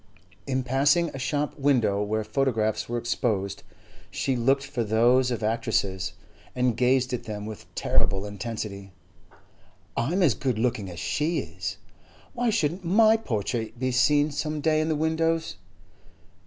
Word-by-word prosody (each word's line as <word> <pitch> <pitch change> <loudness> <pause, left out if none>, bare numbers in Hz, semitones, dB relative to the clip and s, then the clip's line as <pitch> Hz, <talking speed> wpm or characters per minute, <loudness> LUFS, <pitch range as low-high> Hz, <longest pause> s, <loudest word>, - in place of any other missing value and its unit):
In 130 -1 0
passing 140 +6 +3
a 135 - -8
shop 145 +3 -2
window 120 -8 +2
where 110 +1 -1
photographs 110 -5 0
were 120 - -1
exposed, 100 -4 -1 0.5
she 135 - -1
looked 135 +3 +2
for 120 - -2
those 120 +4 +3
of 120 -3 -3
actresses, 95 -4 -1 0.4
and 125 -2 +1
gazed 125 +1 +2
at 120 -1 -3
them 105 -2 -5
with 110 -1 -8
terrible 95 +1 +1
intensity. 100 -2 -6 1.0
'I 120 +8 0
am 190 +1 +2
as 145 -9 +5
good 130 -5 -1
looking 110 -4 -1
as 85 -1 -8
she 150 - 0
is. - - -4 0.6
Why 245 -2 0
shouldn't 180 -4 0
my 215 +5 +5
portrait 115 - -3
be 130 +1 -1
seen 145 +4 +3
some 150 +1 -2
day 155 +1 +2
in 155 - -1
the 155 - +1
windows? 160 +1 0
125 Hz, 150 wpm, -26 LUFS, 110-150 Hz, 1.0 s, as